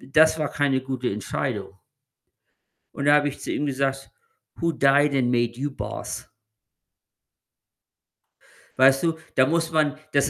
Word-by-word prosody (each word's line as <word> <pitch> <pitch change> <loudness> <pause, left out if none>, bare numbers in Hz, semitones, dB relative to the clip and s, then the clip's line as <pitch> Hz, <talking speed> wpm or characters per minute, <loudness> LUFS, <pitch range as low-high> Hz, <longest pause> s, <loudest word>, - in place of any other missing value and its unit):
„Das 160 +4 +3
war 150 -2 -1
keine 140 -3 0
gute 130 -1 -3
Entscheidung.“ 100 -1 -4 1.2
Und 140 - -4
da 145 0 +6
habe 145 0 +2
ich 140 - -10
zu - - -5
ihm 145 - -1
gesagt: 135 0 -2 0.4
„Who 170 0 0
died 140 0 +3
and 125 -3 +1
made 120 -1 0
you 145 0 -2
boss?“ - - -6 2.5
Weißt 135 +3 +5
du, 165 -1 0 0.2
da 130 - +5
muss 165 +2 0
man 150 -1 +1 0.2
das 140 0 +3
140 Hz, 140 wpm, -24 LUFS, 130-150 Hz, 2.5 s, da